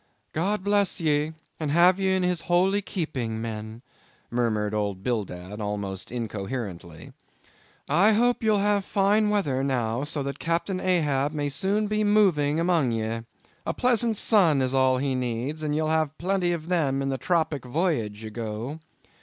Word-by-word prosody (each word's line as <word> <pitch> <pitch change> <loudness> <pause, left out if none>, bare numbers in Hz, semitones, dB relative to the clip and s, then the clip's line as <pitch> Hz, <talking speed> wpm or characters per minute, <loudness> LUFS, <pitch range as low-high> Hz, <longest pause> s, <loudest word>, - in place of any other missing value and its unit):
"God 190 +5 0
bless 200 -1 +2
ye, 155 -1 +1 0.3
and 155 -2 -2
have 175 +5 +5
ye 190 -1 +2
in 185 - 0
His 180 -2 0
holy 190 +3 +2
keeping, 135 - -3
men," 110 +1 -6 0.5
murmured 110 -3 0
old 100 -3 -2
Bildad, 105 -3 -3
almost 100 -2 -4
incoherently. 100 -8 -5 0.7
"I 190 +9 +4
hope 240 +3 +2
ye'll 215 -2 +3
have 205 0 +2
fine 205 +2 +2
weather 145 -11 0
now, 125 -2 -1
so 145 -1 -1
that 140 +1 -5
Captain 170 +3 -1
Ahab 150 -6 +1
may 145 -1 -1
soon 195 +9 0
be 215 +1 0
moving 180 -8 +3
among 165 -7 +2
ye—a 115 +1 -5
pleasant 235 -3 +2
sun 180 -11 +4
is 130 0 0
all 130 -1 +3
he 135 +1 -1
needs, 125 +4 -3
and 150 -1 -1
ye'll 155 0 0
have 155 -1 0
plenty 180 0 0
of 165 -2 -4
them 140 -7 +1
in 135 - -1
the 135 -1 -2
tropic 160 -2 0
voyage 125 - -1
ye 110 - -6
go. 115 +6 -5
150 Hz, 160 wpm, -26 LUFS, 115-185 Hz, 0.7 s, have